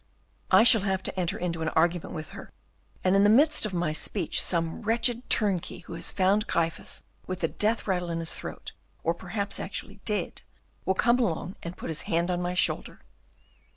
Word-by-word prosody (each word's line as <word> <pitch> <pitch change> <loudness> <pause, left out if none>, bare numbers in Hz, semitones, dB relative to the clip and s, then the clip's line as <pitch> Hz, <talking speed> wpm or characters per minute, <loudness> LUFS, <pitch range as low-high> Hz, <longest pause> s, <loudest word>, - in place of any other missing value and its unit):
"I - - +7
shall 230 -3 +7
have 190 -1 -1
to - - -2
enter 175 -2 0
into 170 -2 -3
an 160 - 0
argument 170 +2 +1
with 155 -1 -7
her; - - -10 0.5
and 185 +1 +3
in 195 - +5
the 205 - +6
midst 290 +2 +5
of - - -7
my 170 -3 0
speech 155 - -1
some 165 -2 0
wretched 235 +2 +1
turnkey 195 -6 +1
who - - -10
has 165 - -2
found 200 +3 +2
Gryphus 165 0 -2 0.2
with 185 0 -4
the 165 - +2
death 215 +7 0
rattle 180 -3 -1
in 165 - -2
his 165 -1 -2
throat, - - -6 0.3
or 165 - +2
perhaps 200 +4 -4
actually 200 +1 -5
dead, 210 -2 -1 0.4
will 190 - +1
come 235 +5 +3
along 185 -4 -1
and 170 +1 -7
put - - -6
his 155 - -1
hand 170 +2 +1
on 175 0 -1
my 180 0 -2
shoulder. - - 0
185 Hz, 195 wpm, -27 LUFS, 170-210 Hz, 0.5 s, I